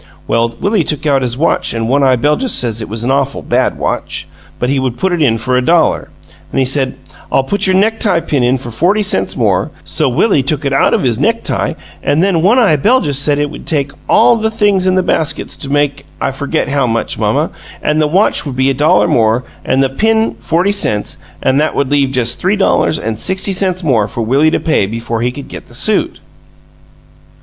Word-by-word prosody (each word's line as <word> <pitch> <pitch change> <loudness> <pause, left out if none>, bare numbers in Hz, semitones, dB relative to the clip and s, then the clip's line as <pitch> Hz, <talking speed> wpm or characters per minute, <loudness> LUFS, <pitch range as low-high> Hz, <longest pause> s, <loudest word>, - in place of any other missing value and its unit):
Well, 115 0 0
Willie 200 -3 +1
took 150 0 -3
out 140 -2 +2
his 125 -1 -2
watch 160 -5 0
an' 115 0 -2
One 140 +4 +2
eye 130 -2 +4
Beljus 150 - +1
said 115 -2 +1
it 110 - -6
was 110 +2 -4
an 125 - 0
awful 140 0 -1
bad - - 0
watch, - - -3 0.3
but 125 - -2
he 135 +1 0
would 130 -2 -2
put 190 +4 0
it 170 - -1
in 115 -6 +2
for 125 +3 -1
a 125 - +2
dollar; 165 +4 +1 0.4
an' - - -4
he 135 - +2
said, 130 0 +1 0.4
'I'll 135 - +2
put 200 +9 +1
your 185 - +2
necktie 205 -2 +2
pin 145 -4 -1
in 125 +2 +2
for 120 -2 -8
forty 185 - +1
cents 200 - 0
more,' - - +1
so - - 0
Willie 200 -11 +2
took 145 +2 -2
it 140 - 0
out 135 - +3
of - - -1
his 120 -3 0
necktie 230 +8 0 0.3
an' 150 - +1
then 185 -3 +1
One 205 +8 +3
eye 205 -12 +4
Beljus 150 - +2
said 145 0 +2
it 145 0 -1
would 150 - -11
take 145 -3 0 0.2
all 235 - +5
the 220 0 0
things 205 -4 +1
in 185 - +2
the 185 - +2
baskets 160 -3 -1
to 140 - -4
make 145 -1 0 0.2
I - - -1
forget 140 +1 -2
how 140 -2 +1
much, 115 0 -2
mamma, - - 0 0.3
an' 150 +1 +1
the 155 - +2
watch 190 +8 +2
would 140 -4 -6
be 130 +1 +2
a - - 0
dollar 150 +4 +3
more, 115 +1 +2 0.2
an' 135 - +1
the 135 - +1
pin 220 +9 +1
forty 175 +5 0
cents, 110 - -1 0.2
an' 130 - +2
that 155 +2 0
would 140 -1 -1
leave 140 -2 +2
just 125 -3 0
three 190 +3 +1
dollars 195 -5 +1
an' 110 0 -4
sixty 190 - +1
cents 185 -1 +1
more 115 -9 +1
for 115 +2 -4
Willie 135 +7 +2
to - - 0
pay 155 - +1
before 115 +1 -4
he 125 +1 0
could 140 +1 -9
get - - -10
the - - -11
suit." - - 0
145 Hz, 225 wpm, -13 LUFS, 125-185 Hz, 0.4 s, all